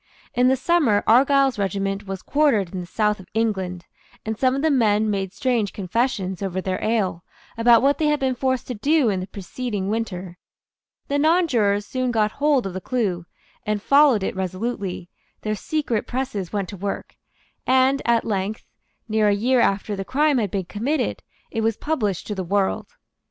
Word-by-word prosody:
In 250 Hz, +1 st, +3 dB
the 260 Hz, -, +4 dB
summer 265 Hz, -7 st, +2 dB
Argyle's 270 Hz, +1 st, +4 dB
regiment 195 Hz, +1 st, -2 dB
was 195 Hz, -1 st, -5 dB
quartered 265 Hz, -, +2 dB
in 185 Hz, -, -3 dB
the 175 Hz, -, -6 dB
south 210 Hz, +2 st, 0 dB
of 185 Hz, -, -13 dB
England, 190 Hz, -6 st, -1 dB, 0.4 s
and 220 Hz, 0 st, -2 dB
some 255 Hz, +3 st, +2 dB
of 275 Hz, -, -2 dB
the 320 Hz, -, +3 dB
men 215 Hz, -4 st, +2 dB
made 195 Hz, -2 st, -2 dB
strange 235 Hz, -3 st, 0 dB
confessions, 195 Hz, -2 st, -1 dB
over 190 Hz, -2 st, -2 dB
their 185 Hz, 0 st, -3 dB
ale, 200 Hz, -6 st, 0 dB, 0.3 s
about 230 Hz, +1 st, +5 dB
what 280 Hz, +1 st, +3 dB
they 310 Hz, -, +2 dB
had 300 Hz, 0 st, +2 dB
been 265 Hz, -1 st, +1 dB
forced 260 Hz, 0 st, -1 dB
to 250 Hz, -, -4 dB
do 275 Hz, +3 st, +2 dB
in 195 Hz, -3 st, 0 dB
the 185 Hz, -, -5 dB
preceding 200 Hz, +1 st, -4 dB
winter. 185 Hz, -5 st, -4 dB, 0.7 s
The 285 Hz, 0 st, 0 dB
nonjurors 255 Hz, -, +2 dB
soon 255 Hz, +3 st, -2 dB
got 215 Hz, -3 st, +1 dB
hold 285 Hz, -3 st, +1 dB
of 190 Hz, -, -4 dB
the 185 Hz, -, -5 dB
clue, 185 Hz, -8 st, -2 dB, 0.4 s
and 210 Hz, 0 st, -1 dB
followed 275 Hz, -2 st, +4 dB
it -, -, -2 dB
resolutely; 190 Hz, 0 st, -3 dB, 0.3 s
their 215 Hz, -, -2 dB
secret 240 Hz, 0 st, -2 dB
presses 245 Hz, -8 st, -3 dB
went 200 Hz, -4 st, -2 dB
to 200 Hz, -, -8 dB
work; 200 Hz, +2 st, -5 dB, 0.5 s
and 260 Hz, +2 st, +3 dB
at 235 Hz, -1 st, +2 dB
length, 205 Hz, 0 st, -2 dB, 0.4 s
near 215 Hz, -1 st, +2 dB
a 205 Hz, -, +4 dB
year 245 Hz, +5 st, +2 dB
after 205 Hz, -1 st, +1 dB
the 195 Hz, -, -4 dB
crime 285 Hz, +4 st, +2 dB
had 210 Hz, -3 st, -1 dB
been 190 Hz, 0 st, -3 dB
committed, 240 Hz, -, -2 dB, 0.3 s
it 225 Hz, -, -2 dB
was 225 Hz, -1 st, 0 dB
published 215 Hz, -, -1 dB
to 210 Hz, -, -4 dB
the 190 Hz, -2 st, -3 dB
world. 195 Hz, +2 st, 0 dB
215 Hz, 185 wpm, -23 LUFS, 195-260 Hz, 0.7 s, about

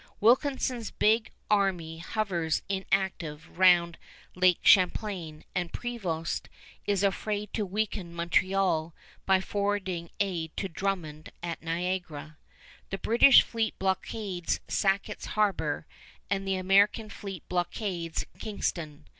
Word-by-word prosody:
Wilkinson's 250 Hz, 0 st, +2 dB
big 220 Hz, +1 st, +2 dB, 0.2 s
army 180 Hz, -6 st, +1 dB
hovers 175 Hz, -4 st, -1 dB
inactive 190 Hz, -5 st, -2 dB
round 175 Hz, -2 st, +5 dB, 0.3 s
Lake 180 Hz, -1 st, +4 dB
Champlain, 180 Hz, -4 st, +3 dB
and 175 Hz, -2 st, -2 dB
Prevost 185 Hz, -10 st, -3 dB, 0.4 s
is 200 Hz, -1 st, +1 dB
afraid 205 Hz, +1 st, -1 dB
to 210 Hz, -3 st, -1 dB
weaken 200 Hz, -2 st, -2 dB
Montreal 170 Hz, -1 st, +1 dB, 0.3 s
by 190 Hz, -1 st, +5 dB
forwarding 190 Hz, -4 st, -2 dB
aid 170 Hz, -5 st, -2 dB
to 195 Hz, -, -1 dB
Drummond 165 Hz, -4 st, -4 dB
at 170 Hz, -1 st, -4 dB
Niagara. 165 Hz, -2 st, -3 dB, 0.5 s
The 195 Hz, -, -3 dB
British 235 Hz, +6 st, +7 dB
fleet 225 Hz, -1 st, -2 dB
blockades 190 Hz, -1 st, -2 dB
Sackett's 195 Hz, 0 st, 0 dB
Harbor, 165 Hz, -8 st, +1 dB, 0.5 s
and 195 Hz, -1 st, -1 dB
the 190 Hz, -, +1 dB
American 200 Hz, +4 st, +3 dB
fleet 195 Hz, -5 st, -8 dB
blockades 175 Hz, -2 st, -2 dB
Kingston. 160 Hz, -8 st, -4 dB
190 Hz, 105 wpm, -28 LUFS, 170-205 Hz, 0.5 s, British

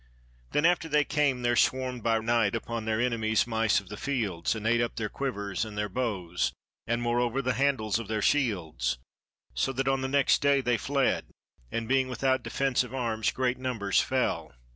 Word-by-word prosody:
Then 150 Hz, -, +2 dB
after 170 Hz, -1 st, +2 dB
they 150 Hz, 0 st, +4 dB
came, 145 Hz, -4 st, +1 dB
there 120 Hz, 0 st, +2 dB
swarmed 130 Hz, 0 st, +1 dB
by 115 Hz, 0 st, +2 dB
night 115 Hz, -2 st, +1 dB
upon 115 Hz, -1 st, -4 dB
their 110 Hz, 0 st, 0 dB
enemies 115 Hz, -3 st, +1 dB
mice 115 Hz, -2 st, +2 dB
of 100 Hz, -3 st, -14 dB
the 105 Hz, -, -7 dB
fields, 110 Hz, -11 st, -1 dB
and 110 Hz, -1 st, -6 dB
ate 115 Hz, +1 st, +3 dB
up 120 Hz, -, -2 dB
their 110 Hz, -2 st, -2 dB
quivers 105 Hz, -8 st, -3 dB
and 110 Hz, -2 st, -7 dB
their 105 Hz, 0 st, -1 dB
bows, 95 Hz, -7 st, -1 dB, 0.3 s
and 120 Hz, +1 st, 0 dB
moreover 120 Hz, +1 st, +1 dB
the 130 Hz, -1 st, 0 dB
handles 120 Hz, -4 st, +1 dB
of 115 Hz, -, -6 dB
their 110 Hz, 0 st, -1 dB
shields, 85 Hz, -, 0 dB, 0.6 s
so 65 Hz, -, 0 dB
that 135 Hz, +1 st, -1 dB
on 135 Hz, 0 st, +2 dB
the 130 Hz, -, -1 dB
next 140 Hz, 0 st, +3 dB
day 140 Hz, -1 st, +4 dB
they 125 Hz, -3 st, +1 dB
fled, 135 Hz, +4 st, 0 dB, 0.5 s
and 115 Hz, -1 st, -2 dB
being 130 Hz, +1 st, +2 dB
without 130 Hz, +1 st, 0 dB
defence 135 Hz, -2 st, 0 dB
of 125 Hz, +1 st, -8 dB
arms 115 Hz, -4 st, 0 dB
great 130 Hz, -1 st, -1 dB
numbers 120 Hz, -6 st, 0 dB
fell. -, -, -1 dB
120 Hz, 190 wpm, -28 LUFS, 110-130 Hz, 0.6 s, they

